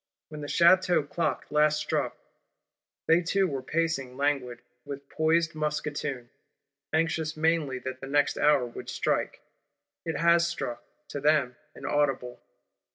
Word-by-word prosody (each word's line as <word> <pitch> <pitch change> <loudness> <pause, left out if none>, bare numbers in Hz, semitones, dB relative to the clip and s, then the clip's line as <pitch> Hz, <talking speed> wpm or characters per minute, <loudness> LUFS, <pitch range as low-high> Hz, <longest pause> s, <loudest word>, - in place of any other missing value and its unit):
When 150 -1 -8
the 145 - -5
Château 175 -1 +4
Clock 170 +3 -1
last 150 0 +3
struck, 150 - -2 0.9
they 165 +2 +5
two 190 +3 +1
were 135 -4 -3
pacing 135 -3 -2
languid, 135 -4 -1 0.2
with 140 0 -8
poised 160 +1 +1
musketoon; 150 -4 -3 0.6
anxious 160 0 0
mainly 155 -4 +1
that 130 +1 -6
the 135 - -6
next 145 +1 +2
hour 145 -4 +4
would 120 - -8
strike. - - -1 0.6
It 165 -3 -3
has 170 +1 +4
struck; 120 -8 -4 0.3
to 145 - -5
them 145 -4 +2 0.2
inaudible. 135 -4 -1
150 Hz, 130 wpm, -28 LUFS, 135-165 Hz, 0.9 s, they